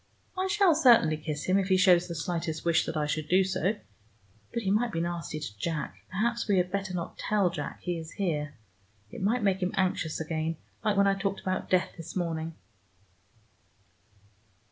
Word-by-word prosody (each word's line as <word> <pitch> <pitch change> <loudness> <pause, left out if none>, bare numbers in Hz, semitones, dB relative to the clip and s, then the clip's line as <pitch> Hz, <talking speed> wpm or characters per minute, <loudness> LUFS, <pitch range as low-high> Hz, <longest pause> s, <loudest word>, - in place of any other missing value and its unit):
I 375 +1 0
shall 390 -3 +4
certainly 240 - +5
kiss 150 -1 -4
him, 185 +2 +3
if 190 - -1
he 190 -1 +4
shows 180 -2 +5
the 170 - -5
slightest 165 0 -3
wish 170 -1 +3
that 155 - -2
I 150 - +1
should 150 0 -2
do 185 +2 +5
so. 190 +2 0 0.8
But 235 - -2
he 195 - +1
might 230 +3 +2
be 165 - -2
nasty 170 -2 -3
to 125 -9 -7
Jack. 155 0 -3
Perhaps 235 +6 -1
we 200 -3 +3
had 180 0 +1
better 195 -2 -2
not 170 -2 -5
tell 200 -4 +2
Jack - - -5
he 175 -2 -2
is 160 0 -9
here. 150 -7 -2 0.6
It - - -8
might 220 +4 +1
make 195 -2 +2
him 180 +2 0
anxious 185 -4 0
again, 160 0 -2 0.3
like 210 -2 +1
when 200 - +5
I 195 - +4
talked 195 0 -2
about 185 0 -2
death 185 -1 +2
this 165 - -8
morning. 165 -2 -2
180 Hz, 190 wpm, -29 LUFS, 160-200 Hz, 0.8 s, certainly